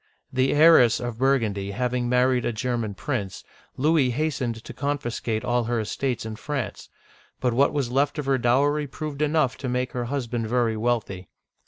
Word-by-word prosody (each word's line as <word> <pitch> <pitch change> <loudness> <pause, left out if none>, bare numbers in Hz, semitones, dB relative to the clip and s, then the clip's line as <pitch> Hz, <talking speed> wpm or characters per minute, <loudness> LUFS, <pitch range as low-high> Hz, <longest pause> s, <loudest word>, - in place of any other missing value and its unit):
The 130 +1 +2
heiress 145 -7 +6
of 120 -2 -5
Burgundy 115 -7 +1
having 125 +1 -1
married 125 0 +3
a - - 0
German 115 -2 -2
prince, 105 -6 -4 0.3
Louis 150 -1 +3
hastened 125 -4 -2
to - - -9
confiscate 125 -6 -2
all 120 -1 +1
her 120 0 0
estates 120 +3 -2
in 110 -1 -6
France; 140 -2 -5 0.5
but 125 -2 0
what 140 +4 +3
was 140 -5 -2
left 140 +4 +1
of 150 - -3
her 135 -1 +2
dowry 145 +5 +2
proved 150 +1 -6
enough 150 -3 +1
to 130 - -4
make 125 +1 -1
her 120 -1 -3
husband 120 -3 -3
very 120 -1 +1
wealthy. 110 -5 -2
125 Hz, 170 wpm, -25 LUFS, 115-140 Hz, 0.5 s, heiress